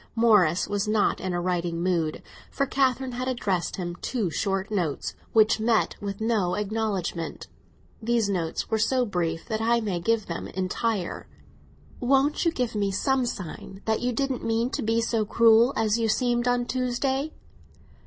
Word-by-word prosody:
Morris 205 -7 +4
was 205 +1 -1
not 215 -1 +1
in 185 - -2
a 175 - -1
writing 175 -1 -1
mood; 170 -4 0 0.3
for 275 - 0
Catherine 265 -1 +1
had 250 +1 -3
addressed 200 -8 -1
him 175 -2 -4
two 215 -6 -2
short 195 +4 -1
notes 175 -8 -1 0.2
which 220 0 +4
met 225 0 +2
with 200 -1 -4
no 220 -5 +1
acknowledgment. 205 -5 -2 0.6
These 230 -1 +1
notes 175 -5 -2
were 220 - +2
so 250 +3 +2
brief 170 -5 -2
that 220 -2 -2
I 235 +1 +3
may 200 -6 -2
give 225 +4 +1
them 170 - -5
entire. 190 +1 -2 0.7
"Won't 275 +6 +2
you 335 - +4
give 250 -7 -2
me 205 -2 0
some 255 +6 +1
sign 190 -1 -7
that 220 0 0
you 250 0 0
didn't 270 +1 -2
mean 230 +2 0
to - - -2
be 225 +1 +1
so 225 -1 0
cruel 230 +3 +5
as 225 0 +2
you 225 -1 +1
seemed 240 +1 +1
on 245 0 +2
Tuesday?" 265 +4 -1
220 Hz, 165 wpm, -26 LUFS, 190-240 Hz, 0.7 s, cruel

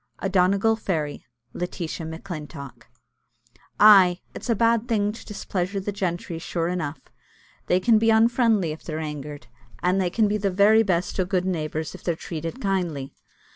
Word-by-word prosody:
A 195 - -3
DONEGAL 195 +4 +3
FAIRY. 155 -9 -3 0.3
LETITIA 170 -2 -4
MACLINTOCK. 155 -5 -8 0.9
Ay, 195 -4 +7
it's - - -8
a 230 - +3
bad 230 +2 +2
thing 210 -3 +1
to 225 - -11
displeasure 195 -2 -3
the 195 +2 -3
gentry, 175 -4 -3
sure 165 0 -2
enough 160 -5 -3 0.7
they 180 - +3
can 220 +3 +4
be 225 +1 +2
unfriendly 225 -5 +3
if 155 - -8
they're 155 -2 -5
angered, 150 -2 -6 0.4
an' 180 +2 +2
they 185 -2 +1
can 215 +4 +2
be 210 +1 0
the 200 -1 0
very 205 +4 +5
best 185 -3 -1
o' 185 - +2
gude 185 -1 0
neighbours 160 -3 -3
if - - -12
they're 170 - 0
treated 165 - -6
kindly. 175 - -2
185 Hz, 165 wpm, -24 LUFS, 165-205 Hz, 0.9 s, Ay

